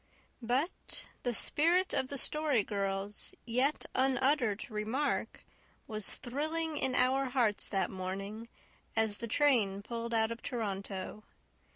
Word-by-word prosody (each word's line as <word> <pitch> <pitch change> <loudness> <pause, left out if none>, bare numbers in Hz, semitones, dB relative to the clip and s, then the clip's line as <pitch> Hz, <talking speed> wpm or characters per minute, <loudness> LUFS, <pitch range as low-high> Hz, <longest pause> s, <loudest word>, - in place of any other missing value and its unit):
But 255 +9 -1 0.2
the 245 - 0
spirit 335 - +3
of 260 - +1
the 280 - -3
Story 295 -5 +2
Girl's 195 0 -1
yet 255 +5 +1
unuttered 260 -4 +2
remark 220 +7 -1 0.4
was 215 -2 -1
thrilling 310 +5 -2
in 260 -3 +1
our 260 +2 +3
hearts 245 -5 +2
that 195 -3 0
morning, 195 +4 -5 0.5
as 220 -2 +2
the 235 - -3
train 220 -7 +3
pulled 235 +1 -3
out 220 0 +2
of 230 - -5
Toronto. 200 -4 -4
235 Hz, 125 wpm, -33 LUFS, 210-270 Hz, 0.5 s, spirit